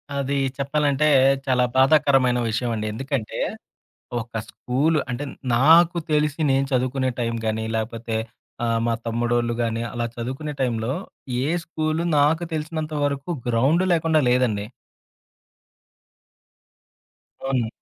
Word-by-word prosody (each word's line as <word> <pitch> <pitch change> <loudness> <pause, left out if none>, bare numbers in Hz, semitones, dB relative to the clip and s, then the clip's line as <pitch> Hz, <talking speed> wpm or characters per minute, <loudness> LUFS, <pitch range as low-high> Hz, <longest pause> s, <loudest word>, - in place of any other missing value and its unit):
అది 140 0 -1 0.2
చెప్పాలంటే, 145 +1 +1 0.4
చాలా 125 -2 +2
బాధాకరమైన 135 -2 +4
విషయం 115 +2 -1
అండి. 110 0 -3
ఎందుకంటే, 130 -2 -3 0.8
ఒక 115 - -12 0.2
స్కూల్ 145 +6 0
అంటే, 125 +4 -3 0.3
నాకు 165 +6 +6
తెలిసి 150 0 +1
నేను 135 +1 +2
చదువుకునే 130 +1 +1
టైం 115 0 -1
గానీ 110 0 -1
లేకపోతే 110 0 -3 0.5
ఆహ్, 115 -1 +1
మా 115 - +1
తమ్ముడోళ్ళు 120 +1 0
గాని 115 -1 -1
అలా 120 -1 -2
చదువుకునే 130 +6 -4
టైంలో 120 0 0 0.5
ఏ - - 0 0.2
స్కూలు 160 0 -2
నాకు 155 +4 +3
తెలిసినంత 155 0 -3
వరకు 140 +2 -2 0.2
గ్రౌండ్ 135 +10 +2
లేకుండా 160 -2 +3
లేదండి. 120 -5 +1 2.8
అవును. 130 -4 0
130 Hz, 110 wpm, -23 LUFS, 120-150 Hz, 2.8 s, నాకు